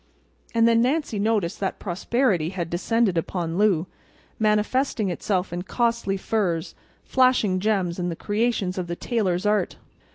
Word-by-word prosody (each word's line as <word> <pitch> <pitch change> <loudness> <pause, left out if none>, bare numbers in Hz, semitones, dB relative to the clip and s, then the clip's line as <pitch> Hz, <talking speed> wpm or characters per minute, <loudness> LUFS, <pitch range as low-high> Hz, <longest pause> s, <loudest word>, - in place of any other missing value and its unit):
And 230 0 +5
then 230 0 +4
Nancy 260 -4 0
noticed 205 -5 0
that 195 - -2
prosperity 190 - 0
had 175 -3 -4
descended 195 +1 +1
upon 170 +1 -3
Lou, 190 -6 +3 0.5
manifesting 215 0 +1
itself 180 0 -1
in 175 - -2
costly 230 0 0
furs, 190 -6 -1 0.3
flashing 255 -8 +3
gems, 190 -4 0
and 175 -2 -2
creations 205 -4 -1
of 180 - -3
the 170 - -3
tailors' 195 -4 -1
art. 210 0 +1
200 Hz, 135 wpm, -24 LUFS, 180-230 Hz, 0.5 s, And